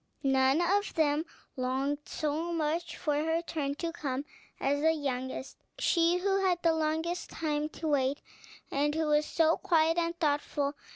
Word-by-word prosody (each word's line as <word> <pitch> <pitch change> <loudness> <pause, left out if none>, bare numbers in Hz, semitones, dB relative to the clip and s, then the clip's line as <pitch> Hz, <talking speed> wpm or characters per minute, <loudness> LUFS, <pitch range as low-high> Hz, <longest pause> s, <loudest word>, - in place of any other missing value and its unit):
None 270 +3 +3
of 400 +4 +1
them 310 0 +2 0.3
longed 265 +3 -1
so 310 +3 -2
much 330 +1 -1
for 300 - 0
her 320 +3 0
turn 285 -4 -2
to 335 +2 -3
come 280 -4 -3 0.3
as 285 +1 +1
the 320 +1 +4
youngest, 260 -3 -4 0.2
she 345 -7 +3
who 390 +1 +1
had 360 -2 +2
the 330 -1 +4
longest 320 +2 -1
time 300 -1 -2
to 315 - -5
wait, 280 -1 +1 0.5
and 295 +2 +1
who 320 0 +1
was 300 0 +2
so 325 0 +3
quiet 330 0 +3
and 340 0 -2
thoughtful. 290 -2 0
310 Hz, 160 wpm, -30 LUFS, 285-335 Hz, 0.5 s, the